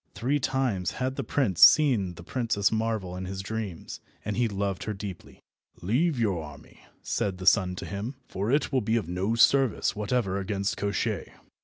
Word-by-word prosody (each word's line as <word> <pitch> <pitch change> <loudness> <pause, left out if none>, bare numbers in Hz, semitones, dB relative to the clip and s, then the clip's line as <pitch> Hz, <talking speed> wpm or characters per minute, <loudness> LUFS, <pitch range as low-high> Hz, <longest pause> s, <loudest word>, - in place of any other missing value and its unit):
Three 140 +5 0
times 125 -8 -1
had 130 +1 -2
the - - -3
prince 115 - 0
seen 115 - +6
the 85 - -11
Princess 110 -2 0
Marvel 110 -5 -1
in 95 +1 -5
his 95 +1 -5
dreams, 105 -5 -5 0.3
and 105 0 -2
he 120 +1 +2
loved 100 -2 -3
her 105 - -3
deeply. 95 -3 -9 0.4
"Leave 130 - +1
your 100 -7 0
army," 75 -2 -13 0.2
said 95 -2 -1
the 95 - -7
sun 95 -2 +4
to - - -6
him, 105 +7 -5
"for 100 +5 -2
it 145 0 +1
will 130 -2 +2
be 110 +1 0
of 110 -7 -1
no 95 +6 -1
service 130 0 +3
whatever 105 -2 -1
against 100 0 -2
Koshchei. 100 0 -2
105 Hz, 180 wpm, -27 LUFS, 95-120 Hz, 0.4 s, seen